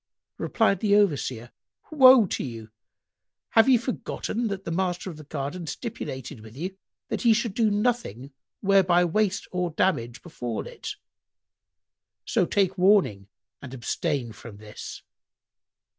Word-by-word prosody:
Replied 205 Hz, -5 st, +1 dB
the 205 Hz, 0 st, +3 dB
Overseer, 135 Hz, -, +1 dB, 0.4 s
"Woe 260 Hz, -6 st, +8 dB
to -, -, -3 dB
you! 115 Hz, -4 st, -8 dB, 0.8 s
Have 225 Hz, +3 st, +5 dB
ye 255 Hz, -, +7 dB
forgotten 235 Hz, -1 st, -3 dB
that 195 Hz, -2 st, -4 dB
the -, -, -3 dB
master 180 Hz, +1 st, -2 dB
of 155 Hz, -, -11 dB
the 155 Hz, -, -10 dB
garden 150 Hz, +4 st, -5 dB
stipulated 145 Hz, -, -6 dB
with 110 Hz, +3 st, -13 dB
you 185 Hz, +5 st, -4 dB, 0.3 s
that -, -, -3 dB
ye 235 Hz, -2 st, +6 dB
should 230 Hz, -2 st, -1 dB
do 220 Hz, 0 st, +2 dB
nothing 205 Hz, -, -1 dB, 0.3 s
whereby 185 Hz, -3 st, +4 dB
waste 200 Hz, +3 st, 0 dB
or 180 Hz, -1 st, -1 dB
damage 140 Hz, -8 st, -1 dB
befal 120 Hz, -9 st, -5 dB
it: -, -, -7 dB, 1.3 s
so 205 Hz, -8 st, +1 dB
take 190 Hz, -2 st, +1 dB
warning 180 Hz, -, +3 dB, 0.3 s
and 135 Hz, -1 st, -8 dB
abstain 120 Hz, 0 st, -2 dB
from 110 Hz, -1 st, -11 dB
this." 105 Hz, 0 st, -9 dB
180 Hz, 135 wpm, -26 LUFS, 130-210 Hz, 1.3 s, Woe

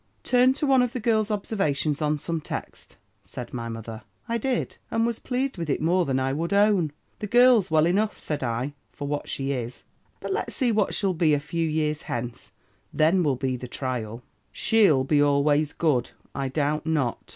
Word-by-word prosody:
"'Turn 250 Hz, +1 st, +4 dB
to 275 Hz, +3 st, -2 dB
one 265 Hz, -2 st, +4 dB
of 250 Hz, 0 st, 0 dB
the 255 Hz, -, -3 dB
girl's 220 Hz, -2 st, +1 dB
observations 165 Hz, -8 st, -1 dB
on 150 Hz, 0 st, +1 dB
some 165 Hz, +2 st, -3 dB
text,' -, -, -7 dB, 0.2 s
said 120 Hz, -1 st, -9 dB
my 115 Hz, -2 st, -4 dB
mother. 115 Hz, 0 st, -7 dB, 0.3 s
"I 235 Hz, 0 st, -1 dB
did; 255 Hz, +1 st, -2 dB
and 225 Hz, 0 st, +1 dB
was 235 Hz, -1 st, -2 dB
pleased 255 Hz, -4 st, -2 dB
with 165 Hz, -2 st, -3 dB
it 140 Hz, -, +1 dB
more 175 Hz, +3 st, +2 dB
than 130 Hz, -1 st, 0 dB
I 135 Hz, +1 st, 0 dB
would 165 Hz, +6 st, -2 dB
own. 200 Hz, -6 st, +3 dB, 0.3 s
'The 210 Hz, -, -4 dB
girl's 240 Hz, -3 st, +5 dB
well 155 Hz, -1 st, +4 dB
enough,' 205 Hz, +5 st, +1 dB
said 150 Hz, -, -4 dB
I, 125 Hz, +3 st, -2 dB, 0.2 s
'for 145 Hz, -, -6 dB
what 145 Hz, 0 st, -3 dB
she 135 Hz, 0 st, -2 dB
is; 125 Hz, -2 st, -5 dB, 0.4 s
but -, -, -3 dB
let's 420 Hz, -, -3 dB
see 250 Hz, -4 st, +2 dB
what 210 Hz, -2 st, +1 dB
she'll 195 Hz, -3 st, +1 dB
be 160 Hz, -3 st, +3 dB
a -, -, 0 dB
few 165 Hz, +2 st, -2 dB
years 155 Hz, -1 st, -1 dB
hence. 120 Hz, 0 st, -5 dB, 0.4 s
Then 165 Hz, +4 st, +3 dB
will 145 Hz, -5 st, +1 dB
be 130 Hz, 0 st, -2 dB
the 125 Hz, 0 st, -7 dB
trial.' 120 Hz, -3 st, -4 dB, 0.3 s
"'She'll 200 Hz, -, +3 dB
be 145 Hz, +2 st, +2 dB
always 145 Hz, +1 st, +2 dB
good, 145 Hz, -8 st, +1 dB, 0.2 s
I 135 Hz, -1 st, -2 dB
doubt 150 Hz, +3 st, -1 dB
not.' 145 Hz, -7 st, -1 dB
155 Hz, 195 wpm, -25 LUFS, 135-210 Hz, 0.4 s, girl's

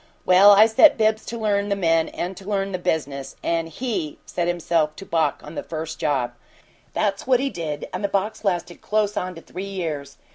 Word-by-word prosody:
Well, 185 Hz, +3 st, +7 dB
I 205 Hz, +1 st, +8 dB
set 225 Hz, +8 st, +6 dB
Bibbs 220 Hz, 0 st, +2 dB
to 235 Hz, -, -4 dB
learn 205 Hz, -2 st, 0 dB
the 200 Hz, -, +1 dB
men 165 Hz, -4 st, +2 dB
and 180 Hz, +2 st, -4 dB
to 195 Hz, +2 st, -10 dB
learn 195 Hz, -1 st, -1 dB
the 185 Hz, -, -3 dB
business, 140 Hz, -5 st, -2 dB
and 165 Hz, -1 st, 0 dB
HE 170 Hz, -, -3 dB
set 175 Hz, -1 st, -2 dB
himself 165 Hz, -3 st, 0 dB
to 195 Hz, -, -9 dB
balk 160 Hz, -6 st, 0 dB
on 150 Hz, -, -9 dB
the -, -, -4 dB
first 160 Hz, 0 st, -6 dB
job! 135 Hz, -6 st, 0 dB, 0.6 s
That's 200 Hz, 0 st, -1 dB
what 255 Hz, -2 st, +4 dB
he 275 Hz, +1 st, -1 dB
did, 155 Hz, -6 st, -4 dB
and -, -, -4 dB
the -, -, +2 dB
balk's 200 Hz, +3 st, -2 dB
lasted 175 Hz, -3 st, -2 dB
close 210 Hz, -1 st, 0 dB
on 185 Hz, -2 st, -3 dB
to 165 Hz, -, -10 dB
three 185 Hz, -, -7 dB
years. 160 Hz, -8 st, -4 dB
180 Hz, 210 wpm, -23 LUFS, 160-205 Hz, 0.6 s, I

